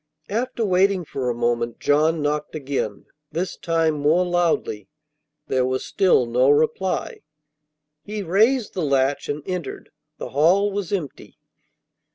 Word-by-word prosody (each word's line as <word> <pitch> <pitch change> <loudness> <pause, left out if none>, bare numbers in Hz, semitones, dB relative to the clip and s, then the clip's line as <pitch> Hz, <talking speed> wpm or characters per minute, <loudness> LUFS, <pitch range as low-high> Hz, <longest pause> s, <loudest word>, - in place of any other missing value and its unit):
After 235 +2 -1
waiting 190 -1 +2
for 130 -4 -3
a 120 - -1
moment 120 0 -1
John 155 +2 +2
knocked 150 +1 -2
again, 135 -8 -3 0.3
this 180 +2 -3
time 165 -2 +1
more 150 +5 +2
loudly. 170 - 0 0.6
There 130 -1 +1
was 130 +1 -1
still 185 - +3
no 125 +3 +2
reply. 155 +6 0 0.8
He 210 0 -5
raised 215 +7 +2
the 185 - -3
latch 140 -2 +1
and 145 0 -3
entered; 180 -4 -5 0.3
the - - -6
hall 180 +8 +3
was 200 -3 -4
empty. 175 -9 -5
160 Hz, 135 wpm, -22 LUFS, 135-190 Hz, 0.8 s, still